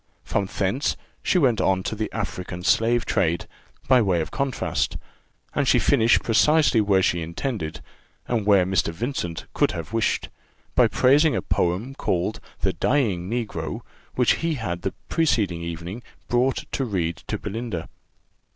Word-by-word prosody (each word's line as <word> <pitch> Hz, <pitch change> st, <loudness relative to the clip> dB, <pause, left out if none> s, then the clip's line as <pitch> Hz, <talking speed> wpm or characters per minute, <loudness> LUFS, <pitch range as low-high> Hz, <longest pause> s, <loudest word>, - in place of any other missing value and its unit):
From 100 Hz, -, -1 dB
thence 100 Hz, +11 st, -1 dB, 0.2 s
she -, -, +2 dB
went 125 Hz, -, +3 dB
on 95 Hz, -1 st, +2 dB
to 110 Hz, -, -3 dB
the 110 Hz, 0 st, -3 dB
African 90 Hz, -5 st, -5 dB
slave 115 Hz, +5 st, +3 dB
trade, 85 Hz, -4 st, +1 dB, 0.4 s
by 130 Hz, -2 st, +6 dB
way 95 Hz, -5 st, +2 dB
of 80 Hz, -, -3 dB
contrast, 135 Hz, -2 st, -1 dB, 0.6 s
and -, -, 0 dB
she -, -, +5 dB
finished 115 Hz, +1 st, +4 dB
precisely 145 Hz, +1 st, +4 dB
where 100 Hz, -2 st, +3 dB
she 85 Hz, -1 st, +1 dB
intended, 85 Hz, -, -4 dB, 0.5 s
and 115 Hz, -3 st, 0 dB
where 100 Hz, -3 st, +5 dB
Mr. 95 Hz, -2 st, +1 dB
Vincent 90 Hz, -4 st, -4 dB
could -, -, +2 dB
have 85 Hz, +5 st, -6 dB
wished, 115 Hz, -1 st, 0 dB, 0.4 s
by -, -, +5 dB
praising 145 Hz, +4 st, +4 dB
a -, -, 0 dB
poem 95 Hz, +10 st, 0 dB
called 95 Hz, -4 st, -1 dB, 0.2 s
'The -, -, +1 dB
dying 100 Hz, -11 st, 0 dB
Negro,' 105 Hz, -10 st, -3 dB, 0.3 s
which 125 Hz, -2 st, +3 dB
he 165 Hz, -1 st, -1 dB
had 90 Hz, -9 st, -4 dB
the 95 Hz, -, -3 dB
preceding 105 Hz, -, +1 dB
evening 85 Hz, +6 st, -6 dB, 0.3 s
brought 125 Hz, +2 st, +1 dB
to 135 Hz, -, -1 dB
read 90 Hz, -8 st, -1 dB
to -, -, -2 dB
Belinda. 110 Hz, -6 st, -4 dB
105 Hz, 150 wpm, -24 LUFS, 90-125 Hz, 0.6 s, by